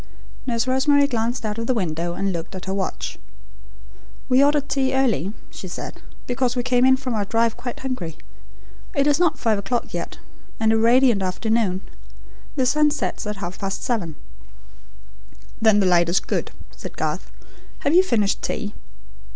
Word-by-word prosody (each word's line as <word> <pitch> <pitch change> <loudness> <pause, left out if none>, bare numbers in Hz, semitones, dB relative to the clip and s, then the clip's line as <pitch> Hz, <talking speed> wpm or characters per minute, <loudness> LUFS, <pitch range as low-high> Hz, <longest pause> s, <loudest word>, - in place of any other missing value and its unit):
Nurse 235 -1 +1
Rosemary 280 +2 +4
glanced 235 -2 -1
out 210 +1 -2
of 230 - -3
the 255 - +2
window 170 -3 -1
and 195 -1 -1
looked 170 +2 -5
at 185 - -6
her 190 - -2
watch. 195 -1 -3 1.1
"We 260 +2 +6
ordered 290 0 +3
tea 265 -1 +1
early," 225 - +2 0.2
she - - -8
said, - - -7 0.2
"because 250 0 0
we 245 - 0
came 250 0 +3
in 260 0 +6
from 260 -2 -3
our 210 -2 0
drive 225 +2 +1
quite 240 0 -6
hungry. 225 -12 -4 0.8
It 280 -1 +3
is 295 +1 +3
not 350 -3 +3
five 220 -3 +1
o'clock 235 +5 -2
yet, - - -4 0.4
and 220 0 +3
a - - +3
radiant 235 -1 +5
afternoon. 190 0 0 0.7
The 260 -3 +2
sun 300 +4 +4
sets 290 - -2
at 210 - -2
half 185 -2 -6
past 195 -1 -3
seven." 190 -11 -1 1.5
"Then 220 -2 +5
the 195 - +3
light 175 -2 +4
is 175 - +3
good," - - -2 0.2
said - - -9
Garth. - - -2 0.5
"Have 285 - +1
you 360 - +8
finished 220 - +1
tea? 210 -2 -3
230 Hz, 170 wpm, -23 LUFS, 195-260 Hz, 1.5 s, you